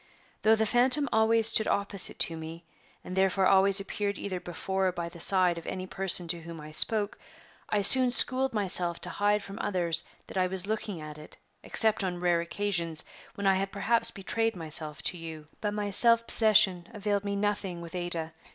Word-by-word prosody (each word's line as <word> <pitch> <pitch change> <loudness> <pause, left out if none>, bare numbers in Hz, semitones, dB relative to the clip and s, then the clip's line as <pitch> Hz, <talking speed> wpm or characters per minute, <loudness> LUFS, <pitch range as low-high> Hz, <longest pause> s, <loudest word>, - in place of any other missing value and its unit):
Though 220 +1 +4
the 220 0 0
phantom 255 +6 +1
always 220 0 +2
stood 220 -1 +1
opposite 200 -1 -1
to 165 - +4
me, 165 +1 -10 0.4
and 185 - -8
therefore 190 0 +1
always 195 +1 +4
appeared 200 +1 -4
either 185 -2 -5
before 190 +2 -3
or - - 0
by 170 -1 -6
the 170 - -14
side 180 -1 +2
of 165 - -14
any 185 0 -5
person 185 -2 -1
to 170 0 -1
whom 165 0 -10
I 150 0 -11
spoke, 205 +6 +4 0.5
I 205 -1 0
soon 255 +4 +8
schooled 255 +2 +4
myself 180 -5 0
to 180 - -5
hide 205 0 0
from 195 0 -10
others 175 -4 0 0.2
that - - -9
I 185 - +1
was 185 0 -1
looking 210 -3 -4
at 155 -1 -10
it 150 - -15 0.2
except 220 -2 +2
on 180 -2 -4
rare 175 -1 0
occasions, 170 -3 -3 0.3
when 200 - -6
I 195 - +4
have 195 +1 -3
perhaps 230 +3 +2
betrayed 225 +3 -3
myself 155 -2 -4
to 180 - 0
you. 160 -2 -9 0.2
But 210 -1 -3
my 205 -1 -4
self 230 +3 +5
possession 190 -7 +2
availed 205 -1 -2
me 200 0 -4
nothing 200 -3 -3
with 170 0 -11
Ada. 175 -3 -5
190 Hz, 195 wpm, -27 LUFS, 170-210 Hz, 0.5 s, soon